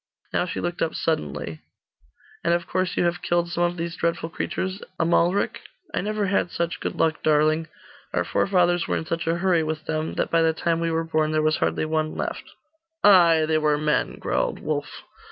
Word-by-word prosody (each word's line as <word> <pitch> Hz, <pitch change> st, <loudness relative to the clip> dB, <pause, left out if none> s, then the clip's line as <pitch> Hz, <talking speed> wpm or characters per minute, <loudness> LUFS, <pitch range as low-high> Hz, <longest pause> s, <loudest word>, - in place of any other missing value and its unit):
Now 180 Hz, -, +1 dB
she -, -, -4 dB
looked 175 Hz, 0 st, -3 dB
up 160 Hz, -, 0 dB
suddenly 75 Hz, -, -2 dB, 0.8 s
'And 170 Hz, 0 st, +3 dB
of 170 Hz, 0 st, -2 dB
course 185 Hz, 0 st, -1 dB
you -, -, +3 dB
have 175 Hz, 0 st, 0 dB
killed 175 Hz, 0 st, 0 dB
some 175 Hz, -, -1 dB
of 175 Hz, 0 st, +1 dB
these 170 Hz, 0 st, -3 dB
dreadful 170 Hz, -1 st, -1 dB
creatures, 190 Hz, +3 st, -3 dB, 0.2 s
Amalric?' 170 Hz, +3 st, +2 dB, 0.3 s
'I -, -, 0 dB
never 210 Hz, +1 st, -1 dB
had 190 Hz, -2 st, +1 dB
such 170 Hz, 0 st, -2 dB
good -, -, -3 dB
luck, 160 Hz, -1 st, +1 dB
darling. 155 Hz, +1 st, +2 dB, 0.4 s
Our -, -, +1 dB
forefathers 175 Hz, -3 st, +2 dB
were -, -, 0 dB
in -, -, -4 dB
such 165 Hz, +1 st, -3 dB
a 165 Hz, +1 st, +1 dB
hurry 175 Hz, -2 st, +2 dB
with 155 Hz, 0 st, -3 dB
them, 155 Hz, 0 st, -2 dB
that -, -, -1 dB
by 165 Hz, -, +4 dB
the 160 Hz, 0 st, +3 dB
time 165 Hz, +1 st, 0 dB
we 165 Hz, 0 st, 0 dB
were 165 Hz, 0 st, 0 dB
born, 155 Hz, -1 st, 0 dB
there 155 Hz, 0 st, +2 dB
was 155 Hz, 0 st, +2 dB
hardly -, -, 0 dB
one 155 Hz, 0 st, -1 dB
left.' -, -, -4 dB, 0.5 s
'Ay, 170 Hz, -5 st, +6 dB
they 155 Hz, 0 st, +2 dB
were 150 Hz, -1 st, +2 dB
men,' 150 Hz, 0 st, 0 dB
growled -, -, -1 dB
Wulf. -, -, -4 dB
165 Hz, 200 wpm, -24 LUFS, 155-175 Hz, 0.8 s, Ay